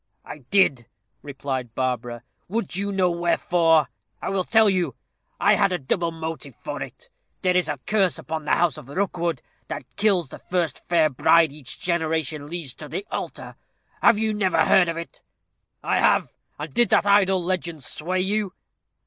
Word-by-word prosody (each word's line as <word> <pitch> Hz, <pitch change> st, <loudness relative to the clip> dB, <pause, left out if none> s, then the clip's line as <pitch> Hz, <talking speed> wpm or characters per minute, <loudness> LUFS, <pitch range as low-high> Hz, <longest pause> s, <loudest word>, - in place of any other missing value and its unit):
"I 150 Hz, -, -8 dB
did," 145 Hz, -, +3 dB, 0.3 s
replied 130 Hz, -4 st, -5 dB
Barbara. 125 Hz, -2 st, -2 dB, 0.2 s
"Would 205 Hz, -2 st, -3 dB
you 200 Hz, +1 st, -1 dB
know 185 Hz, -2 st, +2 dB
wherefore? 170 Hz, -1 st, +2 dB, 0.3 s
I -, -, -4 dB
will 195 Hz, -1 st, 0 dB
tell 220 Hz, -1 st, +5 dB
you. 185 Hz, -3 st, +1 dB, 0.4 s
I -, -, +5 dB
had 200 Hz, -2 st, +3 dB
a 180 Hz, -, +1 dB
double 170 Hz, +4 st, -1 dB
motive 160 Hz, -5 st, -6 dB
for -, -, -6 dB
it. -, -, -9 dB, 0.3 s
There 180 Hz, -1 st, +2 dB
is 180 Hz, -4 st, +2 dB
a 150 Hz, -, -2 dB
curse 200 Hz, -4 st, +2 dB
upon 160 Hz, -1 st, -5 dB
the -, -, +3 dB
house 165 Hz, -4 st, +1 dB
of 135 Hz, -3 st, -14 dB
Rookwood, 170 Hz, -4 st, -2 dB, 0.2 s
that -, -, -5 dB
kills 195 Hz, -8 st, +2 dB
the -, -, -10 dB
first 175 Hz, -6 st, -2 dB
fair 165 Hz, -3 st, +4 dB
bride 165 Hz, +4 st, +4 dB
each 140 Hz, -5 st, -7 dB
generation 160 Hz, -4 st, -1 dB
leads 160 Hz, -5 st, -4 dB
to 150 Hz, -, -9 dB
the 195 Hz, -, -4 dB
altar. -, -, -5 dB, 0.5 s
Have -, -, +6 dB
you 220 Hz, 0 st, 0 dB
never 200 Hz, -3 st, +2 dB
heard 180 Hz, -3 st, +5 dB
of 165 Hz, -, -3 dB
it?" 170 Hz, -, -8 dB, 0.6 s
"I -, -, +1 dB
have! -, -, +3 dB, 0.3 s
And -, -, -7 dB
did 240 Hz, -3 st, +3 dB
that -, -, +4 dB
idle 195 Hz, -2 st, +4 dB
legend 170 Hz, -4 st, -2 dB
sway 180 Hz, +8 st, -2 dB
you?" 200 Hz, 0 st, -1 dB
170 Hz, 175 wpm, -24 LUFS, 150-190 Hz, 0.6 s, Have